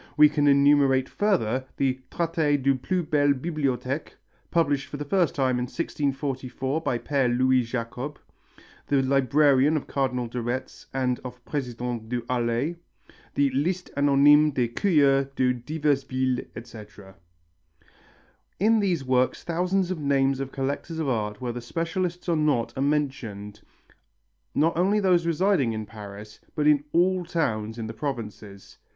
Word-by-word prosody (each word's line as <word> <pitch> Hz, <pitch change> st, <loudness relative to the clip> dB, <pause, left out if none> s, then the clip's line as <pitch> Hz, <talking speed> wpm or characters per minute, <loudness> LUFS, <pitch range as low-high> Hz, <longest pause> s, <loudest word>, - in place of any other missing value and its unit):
We 150 Hz, 0 st, +8 dB
can 145 Hz, -1 st, +1 dB
enumerate 140 Hz, -2 st, +4 dB
further 135 Hz, -, 0 dB
the 130 Hz, -1 st, 0 dB
Traité 160 Hz, -4 st, 0 dB
des 135 Hz, +1 st, +3 dB
plus 175 Hz, +8 st, -2 dB
belles 145 Hz, -2 st, +2 dB
bibliothèques, 140 Hz, -2 st, -2 dB, 0.4 s
published 145 Hz, -5 st, +1 dB
for 145 Hz, -, -6 dB
the 145 Hz, -, -5 dB
first 175 Hz, +2 st, +1 dB
time 130 Hz, -3 st, +1 dB
in 125 Hz, -, -1 dB
1644 135 Hz, -1 st, -3 dB
by 125 Hz, -, -1 dB
Père 125 Hz, 0 st, 0 dB
Louis 130 Hz, 0 st, +4 dB
Jacob, 125 Hz, +4 st, -5 dB, 0.7 s
the 140 Hz, -2 st, +2 dB
librarian 140 Hz, +2 st, +3 dB
of 145 Hz, -, -4 dB
Cardinal 125 Hz, -3 st, -1 dB
de 120 Hz, +1 st, -4 dB
Retz 120 Hz, +3 st, -5 dB
and 130 Hz, -2 st, -1 dB
of 125 Hz, -1 st, -9 dB
President 120 Hz, -4 st, -4 dB
Du 120 Hz, -1 st, -3 dB
Harlay; 125 Hz, +6 st, -1 dB, 0.6 s
the 140 Hz, -1 st, +2 dB
Liste 175 Hz, +8 st, -1 dB
anonyme 145 Hz, +1 st, +5 dB
des 125 Hz, -5 st, 0 dB
curieux 140 Hz, -2 st, +3 dB
des 125 Hz, -1 st, +2 dB
diverses 145 Hz, +3 st, -1 dB
villes, 130 Hz, -1 st, -1 dB
etc. 105 Hz, -4 st, -11 dB, 1.5 s
In 220 Hz, +3 st, +4 dB
these 180 Hz, -8 st, 0 dB
works 130 Hz, 0 st, +1 dB
thousands 180 Hz, +2 st, 0 dB
of 180 Hz, -, -3 dB
names 135 Hz, -2 st, +1 dB
of 135 Hz, -1 st, -4 dB
collectors 140 Hz, +4 st, -3 dB
of 160 Hz, -3 st, -2 dB
art, 105 Hz, -4 st, -2 dB
whether 120 Hz, -1 st, -4 dB
specialists 170 Hz, +7 st, -3 dB
or 170 Hz, -, +2 dB
not, 135 Hz, -7 st, 0 dB
are 130 Hz, -, -3 dB
mentioned, 130 Hz, -8 st, -2 dB, 0.9 s
not 160 Hz, +3 st, +2 dB
only 195 Hz, +5 st, +2 dB
those 180 Hz, -4 st, +2 dB
residing 170 Hz, -, +2 dB
in 110 Hz, -1 st, -4 dB
Paris 105 Hz, -1 st, -10 dB, 0.2 s
but 150 Hz, -, 0 dB
in 150 Hz, -1 st, +4 dB
all 180 Hz, +2 st, +2 dB
towns 115 Hz, -10 st, -2 dB
of 115 Hz, -, -4 dB
the 110 Hz, -, -6 dB
provinces. 110 Hz, -6 st, -7 dB
135 Hz, 145 wpm, -25 LUFS, 125-155 Hz, 1.5 s, We